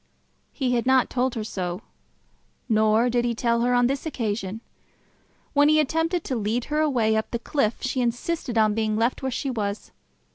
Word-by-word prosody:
He 255 -3 -1
had 240 +1 0
not 260 -2 +3
told 255 0 0
her 220 - -3
so; 180 -4 -4 0.8
nor 220 +1 +3
did 240 0 +1
he 240 -1 -1
tell 235 0 +1
her 245 +1 +2
on 245 0 +4
this 270 +2 -1
occasion. 220 - -3 0.9
When 290 0 +5
he 310 0 +5
attempted 325 +3 0
to 260 - -3
lead 225 +2 -1
her 305 - +2
away 245 -8 +2
up 220 - -1
the 235 - -2
cliff, 235 -2 -1
she 260 0 -1
insisted 240 +2 -2
on 215 -1 +4
being 215 0 0
left 230 +3 0
where 265 - -1
she 265 +2 -2
was. 205 -3 -4
240 Hz, 185 wpm, -24 LUFS, 220-265 Hz, 0.9 s, When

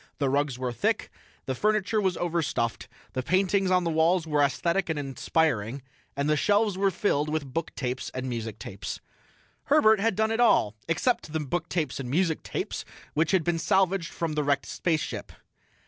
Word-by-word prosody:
The 140 -3 +1
rugs 140 -2 0
were 125 -1 -2
thick, 120 - -1 0.3
the 130 - -1
furniture 215 - +1
was 190 -3 0
overstuffed, 160 -9 -1 0.3
the 130 - -1
paintings 185 +5 +2
on 180 -1 +3
the 170 - 0
walls 165 +2 +3
were 150 -2 +1
aesthetic 170 +6 +1
and 160 - 0
inspiring, 135 -3 0 0.3
the 145 +2 +2
shelves 205 +4 +2
were 195 +1 +2
filled 155 -5 0
with 150 -4 -3
booktapes 130 -5 -3
and 130 0 -4
musictapes. 110 -5 -5 0.7
Herbert 220 -8 +5
had 220 0 +1
done 220 +2 +1
it 225 - -1
all, 225 - +4
except 165 0 0
the 160 - 0
booktapes 155 -1 -2
and 130 -3 -4
musictapes, 160 +3 -1 0.3
which 155 +2 +2
had 190 -4 +3
been 170 +1 0
salvaged 190 0 +1
from 165 -2 -2
the 150 0 0
wrecked 140 -1 +1
spaceship. 160 -3 -2
160 Hz, 165 wpm, -27 LUFS, 140-190 Hz, 0.7 s, Herbert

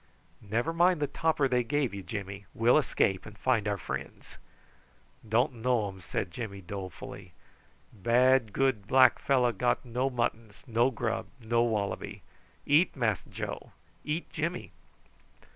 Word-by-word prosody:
"Never 115 +10 -1
mind 175 0 +4
the 145 - +1
topper 155 -1 +1
they 125 -1 +2
gave 135 -1 0
you, 100 - -5
Jimmy. 100 -1 -6
We'll 120 +6 +5
escape 95 -9 0
and 105 0 -12
find 115 -3 +1
our 100 -1 0
friends." - - -7 0.9
"Don't 120 +4 +2
know 120 -1 +1
um," 95 -1 -11
said 85 - -3
Jimmy 100 -1 -6
dolefully. 95 -1 -8 0.6
"Bad 120 +3 +3
good 130 -6 0
black 130 0 +6
fellow 125 -3 +3
got 120 +4 0
no 125 +3 0
muttons 115 -4 -3
no 120 0 +2
grub 120 -2 -2
no 115 0 +1
wallaby. 110 -4 -2 0.4
Eat 155 +5 +4
Mass 110 - 0
Joe - - -6 0.3
eat 155 +3 -2
Jimmy." 170 +3 -3
120 Hz, 140 wpm, -29 LUFS, 105-130 Hz, 0.9 s, black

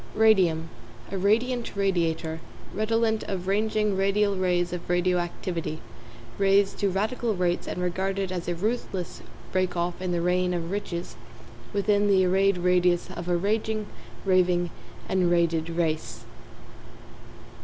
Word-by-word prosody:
=RADIUM= 185 -7 +4 0.4
A 195 - -2
radiant 235 +5 +1
radiator, 165 -5 0 0.3
redolent 220 +1 +1
of 185 -2 -4
ranging 210 0 +1
radial 200 +1 +2
rays 180 -1 0
of 175 -1 -6
radio 180 0 +2
activity, 170 -2 -4 0.6
raised 195 0 +3
to 200 - +2
radical 215 +4 -1
rates 180 -1 0
and - - -4
regarded 190 +1 -1
as 175 -2 -4
a 175 - -1
ruthless 195 -2 -3 0.3
rake 185 -1 0
off 175 +1 -2
in 185 -1 -2
the 175 - 0
reign 180 +1 +1
of 170 0 -3
riches 180 -4 -4 0.6
within 205 0 +2
the 190 -2 +4
arrayed 195 +1 +3
radius 180 -1 +2
of 175 +1 -6
a 175 - +3
raging, 215 +3 -1 0.4
raving 180 -2 +2 0.4
and 185 -2 +2
raided 170 -1 +1
race. 165 -2 -2
185 Hz, 135 wpm, -26 LUFS, 175-200 Hz, 0.6 s, =RADIUM=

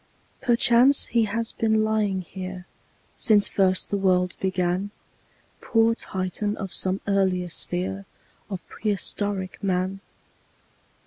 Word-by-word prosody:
Perchance 245 +2 +4
he 230 -2 +2
has 230 +2 -1
been 220 -1 +1
lying 210 -3 0
here 185 0 -7 0.5
Since 215 -5 +4
first 185 -1 +1
the 200 - 0
world 180 -2 +2
began, 185 +1 0 0.7
Poor 225 -1 +3
Titan 200 0 -3
of 195 -3 -6
some 190 +1 +1
earlier 190 -3 +1
sphere 190 +4 -3 0.4
Of 190 -3 -6
prehistoric 205 -2 -3
Man! 190 0 0
195 Hz, 110 wpm, -25 LUFS, 185-215 Hz, 0.7 s, Perchance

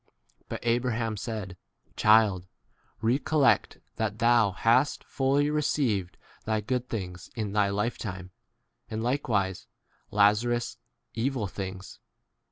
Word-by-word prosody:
But - - -5
Abraham 115 -2 0
said, 105 -3 -5 0.4
Child, 105 -4 +4 0.6
recollect 140 +4 +2 0.2
that 110 -1 -1
thou 115 -2 +4
hast 115 +8 +2
fully 140 +2 +1
received 115 -11 0
u - - -28
thy 110 -1 +1
good 125 +3 -2
things 90 -5 -5
in 110 -4 -3
thy 105 -1 +3
lifetime, 100 -3 -3 0.6
and 110 0 -3
like 135 +4 -1
wise 95 -4 0 0.4
Lazarus 105 +4 +2 0.3
evil 120 -1 -1
things. 95 0 -7
110 Hz, 110 wpm, -28 LUFS, 100-120 Hz, 0.6 s, Child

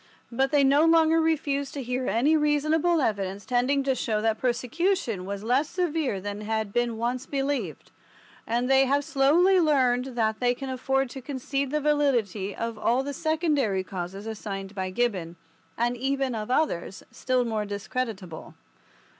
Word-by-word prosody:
But 265 +3 +1
they 290 -1 +3
no 280 +3 +5
longer 325 0 +4
refuse 285 -4 0
to 280 - -4
hear 250 +1 -2
any 275 +8 +3
reasonable 305 +2 +2
evidence 200 -4 -2
tending 255 +3 +1
to 270 -1 +1
show 220 -4 -1
that 220 0 0
persecution 250 - -1
was 200 0 -5
less 255 +6 +1
severe 325 - -1
than 205 +2 -5
had 220 -1 -2
been 240 -2 0
once 245 +3 -2
believed, 275 0 -3 0.6
and 240 +2 0
they 270 0 +5
have 280 +2 +1
slowly 320 +7 +4
learned 260 -6 +2
that 220 -1 +1
they 245 0 +2
can 270 +1 -6
afford 265 0 0
to 265 - -7
concede 275 +1 -3
the 300 +2 0
validity 250 -10 0
of 230 -1 -4
all 245 +5 +1
the 285 +1 -4
secondary 300 - 0
causes 190 +2 -6
assigned 200 -3 -6
by 190 -2 -3
Gibbon 185 -6 -1 0.4
and 240 +1 0
even 270 +1 -1
of 215 0 -4
others 250 - -1
still 255 -1 0
more 220 -2 -2
discreditable. 205 -4 -5
255 Hz, 160 wpm, -26 LUFS, 220-285 Hz, 0.6 s, no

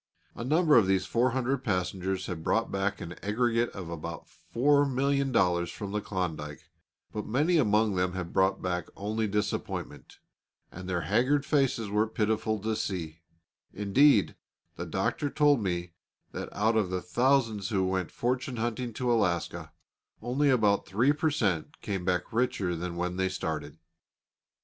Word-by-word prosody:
A - - -6
number 155 +3 +4
of 105 -5 +5
these 95 -1 +2
four 120 +6 +2
hundred 130 +2 -1
passengers 95 -1 -1
had 85 -3 -5
brought - - +1
back 95 +1 -1
an 85 - -6
aggregate 115 +3 +1
of 95 -4 -8
about 85 0 -6
$4,000,000 135 - +1
from 100 -2 -6
the 105 +1 -1
Klondike; 80 -7 -4 0.4
but 105 -1 -4
many 150 +9 +2
among 110 -5 +3
them 90 0 0
had 90 -2 -5
brought 95 0 +2
back 90 -2 -2
only 110 +2 -1
disappointment, 105 0 -3 0.5
and 90 +1 -8
their 90 -2 0
haggard 125 - +2
faces 135 -7 +1
were 105 +2 +2
pitiful 110 0 0
to 110 +1 -1
see; 85 -6 -4 0.6
indeed, 105 +3 +4 0.4
the - - -5
Doctor 145 - -1
told 145 -4 +3
me 90 -3 -2 0.4
that - - -6
out 110 +2 +1
of 105 -4 +2
the 90 -1 -3
thousands 115 -1 +1
who 95 -4 +1
went 95 -2 -1
fortune 125 +1 -2
hunting 120 +1 -2
to 125 +2 -1
Alaska, 90 -7 -1 0.5
only 140 +4 +1
about 105 -6 +3
3 120 +9 +3
per 155 +1 +1
cent. 100 - -1
came 95 -3 -3
back 90 +1 -1
richer 105 -7 0
than 85 +1 -4
when 90 +1 -2
they 95 0 +1
started. 80 -5 -4
105 Hz, 155 wpm, -29 LUFS, 90-125 Hz, 0.6 s, of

